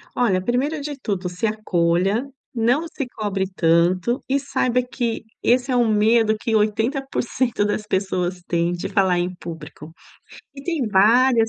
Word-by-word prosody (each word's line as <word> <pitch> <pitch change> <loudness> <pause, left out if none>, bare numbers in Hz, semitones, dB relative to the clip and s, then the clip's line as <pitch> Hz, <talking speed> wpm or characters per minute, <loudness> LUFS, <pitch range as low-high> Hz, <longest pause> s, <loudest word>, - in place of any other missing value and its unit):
Olha, 190 -7 +1
primeiro 270 +8 0
de 290 0 -5
tudo, 195 -6 -3
se 180 +5 -2
acolha, 195 +3 0 0.2
não 245 +7 +1
se 280 -4 -5
cobre 205 -5 -2
tanto 180 +8 +2
e 275 +1 +2
saiba 255 -3 0
que 240 -2 -3 0.2
esse 250 +2 +2
é - - +2
um 240 -3 +3
medo 220 +1 +3
que 225 0 -1
80% 235 +1 0
das 210 +1 -1
pessoas 185 -2 -1
têm 170 0 0
de 175 - -4
falar 190 -4 +2
em 175 +1 -1
público. 160 -3 -9 0.6
E 275 - -9
tem 315 -6 -1
várias 225 +4 +4
220 Hz, 150 wpm, -22 LUFS, 185-250 Hz, 0.6 s, várias